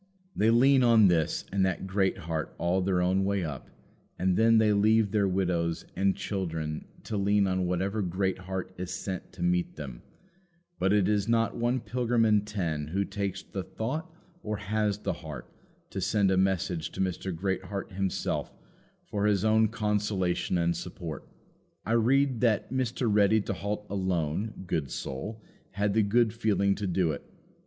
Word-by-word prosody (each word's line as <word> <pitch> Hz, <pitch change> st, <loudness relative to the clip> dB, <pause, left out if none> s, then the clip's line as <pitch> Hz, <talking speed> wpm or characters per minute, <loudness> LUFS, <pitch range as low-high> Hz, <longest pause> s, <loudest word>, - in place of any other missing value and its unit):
They 110 Hz, -, +3 dB
lean 130 Hz, +4 st, +5 dB
on 115 Hz, -5 st, +6 dB
this 80 Hz, -3 st, +1 dB
and 95 Hz, 0 st, +2 dB
that 95 Hz, 0 st, 0 dB
Greatheart 95 Hz, -5 st, -1 dB
all 90 Hz, +3 st, +1 dB
their 90 Hz, -1 st, +1 dB
own 95 Hz, +2 st, +2 dB
way 100 Hz, -1 st, 0 dB
up, 75 Hz, -5 st, -6 dB, 0.5 s
and 90 Hz, -1 st, +1 dB
then 115 Hz, +2 st, +5 dB
they 110 Hz, -1 st, +4 dB
leave 105 Hz, 0 st, +3 dB
their 100 Hz, -2 st, +2 dB
widows 90 Hz, -3 st, 0 dB
and 95 Hz, 0 st, +2 dB
children 80 Hz, -6 st, -3 dB, 0.2 s
to 110 Hz, -, -3 dB
lean 100 Hz, 0 st, +3 dB
on 95 Hz, -1 st, 0 dB
whatever 95 Hz, +4 st, -1 dB
Greatheart 95 Hz, 0 st, -2 dB
is 90 Hz, -1 st, -4 dB
sent 95 Hz, 0 st, -5 dB
to 85 Hz, -, -5 dB
meet 90 Hz, 0 st, +1 dB
them; 65 Hz, -5 st, -7 dB, 0.8 s
but 95 Hz, -, +2 dB
it 100 Hz, -2 st, +3 dB
is 105 Hz, -1 st, +1 dB
not 115 Hz, -1 st, +2 dB
one 120 Hz, +1 st, 0 dB
pilgrim 120 Hz, -2 st, +1 dB
in 105 Hz, -2 st, +4 dB
ten 85 Hz, -8 st, -2 dB
who 100 Hz, +5 st, -1 dB
takes 100 Hz, -1 st, -3 dB
the 95 Hz, -, -5 dB
thought 145 Hz, -, -4 dB, 0.3 s
or 105 Hz, 0 st, -3 dB
has 105 Hz, 0 st, 0 dB
the 105 Hz, -, -2 dB
heart 75 Hz, -4 st, -8 dB, 0.4 s
to 95 Hz, -, -3 dB
send 100 Hz, 0 st, +2 dB
a -, -, +3 dB
message 95 Hz, -3 st, 0 dB
to -, -, -8 dB
Mr. 95 Hz, 0 st, -1 dB
Greatheart 95 Hz, +3 st, -3 dB
himself 95 Hz, 0 st, -2 dB, 0.5 s
for 105 Hz, 0 st, -1 dB
his 100 Hz, -1 st, +2 dB
own 110 Hz, 0 st, +4 dB
consolation 105 Hz, -5 st, 0 dB
and 85 Hz, 0 st, +1 dB
support. 85 Hz, -3 st, -6 dB, 0.6 s
I 110 Hz, -, -2 dB
read 125 Hz, +2 st, +3 dB
that 115 Hz, 0 st, +1 dB
Mr. 130 Hz, -1 st, 0 dB
Ready 105 Hz, 0 st, +4 dB
to -, -, -3 dB
halt 105 Hz, +1 st, -4 dB
alone, 95 Hz, +1 st, -2 dB
good 80 Hz, -6 st, -1 dB
soul, 105 Hz, -, -5 dB, 0.3 s
had 100 Hz, +1 st, 0 dB
the 110 Hz, -, +4 dB
good 110 Hz, +2 st, +3 dB
feeling 105 Hz, -3 st, +2 dB
to 100 Hz, 0 st, -3 dB
do 90 Hz, -2 st, +1 dB
it. 70 Hz, -, -6 dB
100 Hz, 165 wpm, -28 LUFS, 90-110 Hz, 0.8 s, on